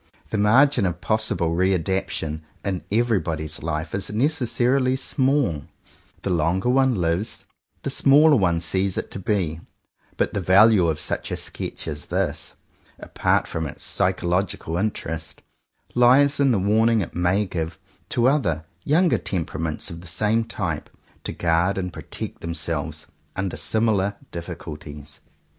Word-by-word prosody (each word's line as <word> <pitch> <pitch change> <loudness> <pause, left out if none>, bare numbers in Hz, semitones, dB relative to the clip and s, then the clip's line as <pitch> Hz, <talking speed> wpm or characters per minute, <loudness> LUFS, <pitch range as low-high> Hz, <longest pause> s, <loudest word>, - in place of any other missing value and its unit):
The 110 - 0
margin 120 +2 +4
of 90 -1 -3
possible 110 -5 0
re 95 +3 +2
adaption 80 -3 -2 0.2
in 95 -3 -2
every 115 -1 +2
body's 80 -2 -3
life 80 0 -3
is 100 - -3
necessarily 125 +1 +1
small; 130 - 0 0.6
the 95 - -1
longer 90 +6 +1
one 130 -1 +3
lives, 90 +3 -1 0.4
the - - -2
smaller 150 +2 +6
one 85 -7 +2
sees 95 +2 0
it - - -3
to - - -5
be; 90 -5 -1 0.6
but - - 0
the 100 - -1
value 95 0 +6
of 80 -2 0
such - - -2
a - - -3
sketch - - -5
as 75 -2 -5
this, - - -2 0.4
apart - - 0
from 80 -1 -3
its 70 - -8
psychological 90 -2 0
interest, 80 -5 -3 0.5
lies 135 +4 +5
in 140 -1 +4
the 120 - +3
warning 110 +3 +3
it 90 - -5
may 90 +4 +1
give, 80 -3 -4 0.3
to 120 +1 +2
other, 85 - +1 0.2
younger 170 +4 +3
temperaments 80 -2 -3
of 85 0 -8
the 90 - -12
same 105 +6 +1
type, 90 -9 -3 0.3
to - - -3
guard 85 +3 +1
and 90 -2 -3
protect - - -7
themselves 85 0 -4 0.3
under 95 -1 -2
similar 105 -3 +1 0.2
dif 85 0 -6
ficulties. 75 -3 -8
95 Hz, 145 wpm, -23 LUFS, 85-115 Hz, 0.6 s, smaller